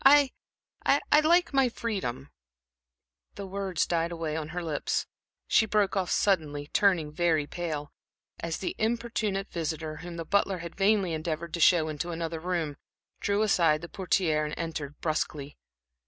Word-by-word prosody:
I 280 0 +7 0.5
I 290 +1 +4
like 335 +1 +3
my 270 -2 +4
freedom" 185 - -4 1.0
The 200 - -6
words 190 -3 -1
died 170 0 0
away 165 -2 -3
on 155 -1 -3
her 175 +2 -4
lips. 155 -3 -1 0.4
She 220 - +4
broke 205 -2 +2
off 190 -2 0
suddenly, 150 -7 +1
turning 180 -7 +3
very 160 -1 +2
pale, 150 -3 -4 0.5
as 165 -1 -3
the 185 - -3
importunate 220 -3 -1
visitor, 160 -2 -3
whom 170 +1 -8
the 165 - -4
butler 200 +1 +2
had 170 -1 -7
vainly 195 -3 +2
endeavored 160 +1 -3
to 170 - -2
show 165 -2 +5
into 155 +2 -3
another 165 -1 -3
room, 165 -4 -2 0.4
drew 205 +1 +1
aside 165 -7 +3
the 170 - -8
portière 175 -5 +1
and 150 0 -3
entered 155 -3 -5
brusquely. 150 -2 -2
170 Hz, 155 wpm, -28 LUFS, 155-200 Hz, 1.0 s, I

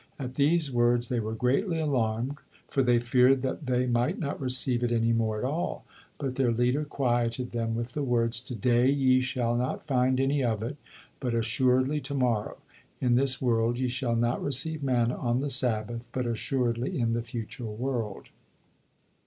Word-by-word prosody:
At 130 -3 -5
these 150 +2 +2
words 120 0 +2
they 125 -2 0
were 110 0 -3
greatly 140 - +1
alarmed, 130 -2 0 0.3
for 135 - 0
they 125 -2 +4
feared 125 +2 +3
that 135 +2 -3
they 125 0 +1
might 125 +8 +1
not 145 -4 -4
receive 130 -1 +1
it 120 - 0
any 115 0 +2
more 110 -1 0
at 105 - -4
all, 155 +6 -3 0.3
but 135 -3 -3
their 130 -2 +1
leader 125 +5 +1
quieted 120 -3 -1
them 115 -1 -2
with 120 +1 -4
the 150 - -2
words, 120 -3 +1
"To 125 0 -7
day 120 +4 +3
ye 130 -2 +3
shall 125 -2 -1
not 125 +5 -2
find 130 -2 +2
any 135 +1 +1
of 110 -3 0
it, 135 +6 -4 0.4
but 125 -3 -2
assuredly 130 +5 +2
to 140 +2 -4
morrow; 120 -5 0 0.4
in 125 -2 +2
this 130 +1 +3
world 120 -1 +1
ye 130 0 0
shall 120 -1 -1
not 120 +1 0
receive 145 +3 -1
manna 125 -3 +1
on 120 0 0
the 140 +1 -2
Sabbath, 120 -2 -1
but 125 -1 -2
assuredly 120 +1 -1
in 115 -1 +1
the 115 - 0
future 115 +1 -6
world." 115 -1 -4
125 Hz, 180 wpm, -28 LUFS, 115-135 Hz, 0.4 s, they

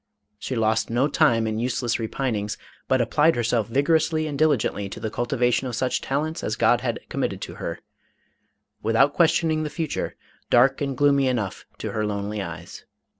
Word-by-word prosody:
She 130 - -4
lost 110 -1 +1
no 120 +4 +2
time 140 -7 +3
in 110 0 -2
useless 120 -1 -1
repinings, 110 -2 -2 0.3
but 130 -1 +3
applied 150 +7 +3
herself 115 -2 0
vigorously 155 +4 +2
and 150 -2 -4
diligently 135 -9 +1
to - - -8
the 110 - -4
cultivation 120 +1 0
of 125 - -4
such 125 +2 0
talents 155 +4 -2
as - - -1
God - - +3
had - - -2
committed - - -2
to - - -6
her, - - -3 1.0
without 115 +6 +3
questioning 160 -2 +2
the 155 - -2
future, 150 +1 -3 0.3
dark 130 +4 +4
and 140 -2 -2
gloomy 140 -1 +4
enough 110 -7 -2
to - - -4
her 110 - -1
lonely 105 0 -2
eyes. 85 -2 -8
125 Hz, 170 wpm, -24 LUFS, 110-145 Hz, 1.0 s, dark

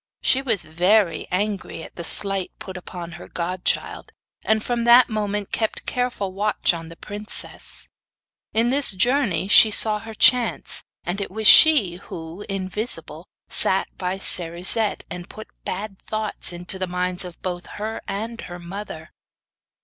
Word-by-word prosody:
She 265 - +3
was 225 -8 0
very 180 +3 +2
angry 195 -3 -2
at - - -11
the 170 - -6
slight 195 +2 -2
put 190 - -9
upon 175 -1 -8
her 175 +1 -10
godchild, 180 +1 -2 0.3
and 220 0 +1
from 240 -1 -1
that 240 +2 +7
moment 210 -2 -2
kept 220 -1 -2
careful 245 -7 -2
watch 205 -1 +1
on 165 -1 -7
the 165 - -11
princess. 210 +4 -5 0.6
In 230 +2 +2
this 275 -5 +5
journey 235 - +1
she 215 +2 +8
saw 215 0 +5
her 225 0 -9
chance, 245 +1 +3 0.2
and 180 +4 -3
it 200 - -4
was 215 +3 -5
she 260 - +8
who, 165 +2 -9
invisible, 195 +4 -4 0.2
sat - - +1
by 185 +1 -3
Cerisette, 185 +4 +1
and 175 0 -7
put 215 - -10 0.2
bad 195 +1 -4
thoughts 215 -3 -1
into 175 +2 -7
the 185 - -2
minds 180 +1 -2
of 180 -2 -10
both 180 -1 -4
her 220 +2 -5
and 225 +4 -4
her 175 - -8
mother. 175 -2 -8
195 Hz, 150 wpm, -22 LUFS, 180-220 Hz, 0.6 s, she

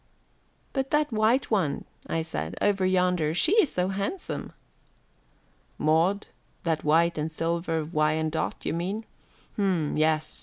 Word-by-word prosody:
"But 270 -1 -1
that 300 -1 +2
white 225 +4 +2
one," 185 -10 +1 0.2
I 165 - -1
said, 80 - -4
"over 200 -2 +2
yonder. 180 -4 +2
She 315 - +3
is 300 - 0
so 180 +1 0
handsome." 200 - -3 1.3
"Maud, 165 +7 +2 0.4
that 160 -2 0
white 165 +2 +3
and 155 +1 -2
silver 165 -1 -1
Wyandotte, 155 0 0
you - - 0
mean. 190 +7 -3 0.5
H'm, 180 -7 +1
yes. 155 0 +1
170 Hz, 125 wpm, -27 LUFS, 155-200 Hz, 1.3 s, She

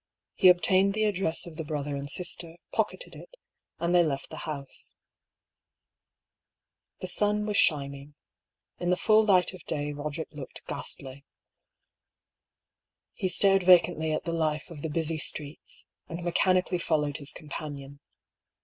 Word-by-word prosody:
He 185 - +5
obtained 190 +2 +5
the 215 - +1
address 190 -6 0
of 165 -2 -10
the 160 - -3
brother 145 -1 -3
and 140 0 -5
sister, 170 0 -3 0.2
pocketed - - -2
it, - - -13 0.4
and 170 +1 0
they 175 - +7
left 140 -4 -3
the 155 - -7
house. 140 -3 -7 2.1
The 185 - -3
sun 210 +3 +1
was 210 -1 0
shining. 140 -1 +1 0.6
In 175 - -1
the 180 - +3
full 215 +3 +5
light 185 -4 +3
of 185 - -11
day 145 -1 -2
Boderick 150 +2 -5
looked 145 -3 -8
ghastly. 135 +1 -4 1.9
He 185 - -2
stared 195 +1 +4
vacantly 175 -3 +5
at 155 - -1
the 170 - -3
life 155 0 -1
of 150 -3 -8
the 160 - -3
busy 160 +1 -1
streets, 150 0 -4 0.2
and 170 +1 -5
mechanically 180 +1 +2
followed 150 -4 0
his 145 -2 -7
companion. 145 -2 -7
165 Hz, 140 wpm, -28 LUFS, 145-185 Hz, 2.1 s, they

